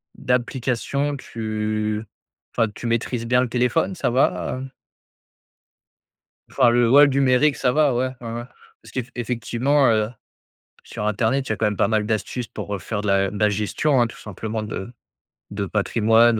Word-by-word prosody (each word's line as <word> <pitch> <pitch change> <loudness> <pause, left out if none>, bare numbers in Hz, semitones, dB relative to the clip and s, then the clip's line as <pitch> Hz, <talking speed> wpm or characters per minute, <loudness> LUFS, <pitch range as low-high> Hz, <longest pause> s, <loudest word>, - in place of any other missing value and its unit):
d'application, 130 +3 -1
tu 110 -2 -3 0.5
enfin 115 - +2
tu - - -8
maîtrises 115 0 -1
bien 125 +2 +3
le 125 - -1
téléphone 145 +10 +1
ça 145 - 0
va, 130 0 +1
heu? 135 - -6 1.8
Enfin 130 -3 +4
le, 120 0 +3
ouais, 140 +4 +8
le - - +2
numérique 135 +2 +3
ça 125 - +1
va? 145 -2 +3
Ouais, 125 +2 +1
ouais 115 -1 -6
ouais. 120 +1 -4 0.4
Parce - - -15
qu'effectivement, 125 +2 0
heu, 110 -1 +2 0.7
sur 105 - -6
internet 115 +6 0
il - - -7
y - - +2
a - - -2
quand 110 - +1
même 105 -1 0
pas - - +3
mal 110 -2 +1
d'astuces 110 +2 -2
pour, 100 - -5
heu, 100 - -6
faire 105 +1 -4
de 105 - -4
la 100 -1 +2
de 105 - -6
la 105 -1 +4
gestion, 110 +7 +1
hein, 120 - +3
tout - - -12
simplement 110 +2 -5
de 105 0 -6 0.6
de 100 0 -2
patrimoine 110 +3 +3
115 Hz, 175 wpm, -22 LUFS, 110-130 Hz, 1.8 s, ouais